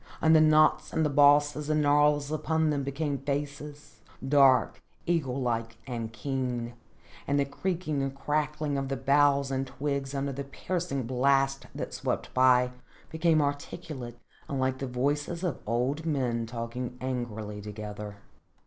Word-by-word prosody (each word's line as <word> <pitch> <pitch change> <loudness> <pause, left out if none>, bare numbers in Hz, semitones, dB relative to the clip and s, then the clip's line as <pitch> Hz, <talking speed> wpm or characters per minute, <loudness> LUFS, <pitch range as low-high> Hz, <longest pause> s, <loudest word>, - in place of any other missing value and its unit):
And 160 0 +5
the 155 - +7
knots 155 0 +4
and 150 -3 +1
bosses 145 +1 +4
and 155 -1 +2
gnarls 145 0 +3
upon 160 0 +1
them 145 -1 0
became 140 +1 -2
faces, 145 +1 -5 0.3
dark, 135 -2 +4 0.2
eagle 145 -7 0
like 115 -2 -2
and 115 -3 -4
keen, 125 0 -3 0.5
and 140 +1 +2
the 140 - +2
creaking 160 -1 -2
and 135 0 -3
crackling 150 0 -1
of 135 -1 -4
the 135 - -2
boughs 140 +1 +3
and 135 0 -1
twigs 140 0 -3
under 140 0 -1
the 140 +2 -4
piercing 150 0 -3
blast 135 +2 +1
that - - -5
swept - - -3
by, 125 -1 +4 0.4
became 160 -1 +3
articulate 145 -3 -5 0.3
and 140 - -2
like 130 0 0
the 135 - -3
voices 145 +7 -1
of 170 -8 -2
old 125 +7 0
men 125 -7 -1
talking 120 +2 -5
angrily 110 -5 -4
together. 105 0 -7
140 Hz, 145 wpm, -28 LUFS, 125-150 Hz, 0.5 s, the